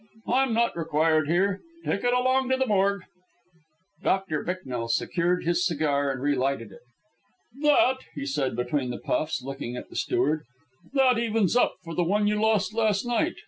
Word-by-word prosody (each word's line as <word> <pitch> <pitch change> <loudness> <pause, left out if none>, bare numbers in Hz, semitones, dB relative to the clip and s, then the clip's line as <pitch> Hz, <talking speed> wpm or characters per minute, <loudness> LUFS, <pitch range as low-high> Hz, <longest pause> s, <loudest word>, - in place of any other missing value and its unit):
I'm 265 0 +2
not 235 +1 +1
required 160 -2 +1
here. 190 +4 +1 0.3
Take 200 - -1
it 245 - +2
along 255 +1 +2
to 260 - +2
the 265 - +1
morgue." 200 -3 +1 1.0
Doctor 190 -6 0
Bicknell 130 -10 -4
secured 175 +9 0
his 175 +1 +1
cigar 145 -5 +1
and 130 - -4
relighted 135 -5 0
it. 95 - -14 0.8
"That," 290 -3 +4 0.2
he - - -4
said 135 -2 -1
between 125 +2 -1
the 120 - -4
puffs, 155 -4 -2
looking 135 -2 -5
at - - -8
the - - -12
steward, 155 +2 0 0.5
"that 260 -4 +4
evens 225 -3 +1
up 245 - +3
for 165 -1 -7
the 175 - +1
one 205 +5 +1
you 210 0 +1
lost 215 -1 +2
last 220 -2 +1
night. 245 +8 0
180 Hz, 170 wpm, -26 LUFS, 145-225 Hz, 1.0 s, That